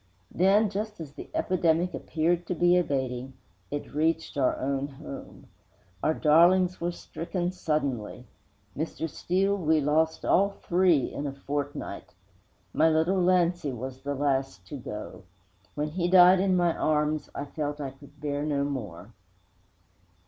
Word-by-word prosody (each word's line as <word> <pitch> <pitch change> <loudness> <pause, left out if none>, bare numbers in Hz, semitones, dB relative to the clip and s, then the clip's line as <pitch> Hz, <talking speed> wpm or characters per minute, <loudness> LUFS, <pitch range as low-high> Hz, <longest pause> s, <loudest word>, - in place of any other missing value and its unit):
Then, 200 +3 +3
just 210 0 -4
as 155 -4 -7
the - - -10
epidemic 175 -1 +1
appeared 170 +2 -1
to 180 - -1
be 175 +1 +4
abating, 130 -6 -1 0.4
it 145 - -5
reached 160 +2 0
our 135 -3 +1
own 140 +1 -1
home. 135 - -10 0.6
Our 155 - +1
darlings 175 +4 +4
were 175 +1 0
stricken 175 +1 -4
suddenly. 140 - -2 0.5
Mr. 160 +1 -3
Steele, 190 +5 0
we 160 -5 +2
lost 155 +2 +1
all 200 +2 +4
three 175 -5 +2
in 145 - -3
a - - -3
fortnight! 140 -5 -5 0.6
My 160 +1 +4
little 165 +4 +2
Lancy 175 -4 +2
was 130 +2 -7
the 145 0 -3
last 135 -8 -1
to - - -6
go. 105 -5 -7 0.5
When 150 +1 -1
he 175 +2 -1
died 180 0 +7
in 190 -1 +2
my 175 -2 +2
arms 150 -1 0
I 140 - -3
felt 145 0 -4
I 140 -2 -4
could 140 +2 -18
bear 145 0 -2
no 145 -2 0
more. 115 -8 -5
155 Hz, 145 wpm, -27 LUFS, 140-175 Hz, 0.6 s, died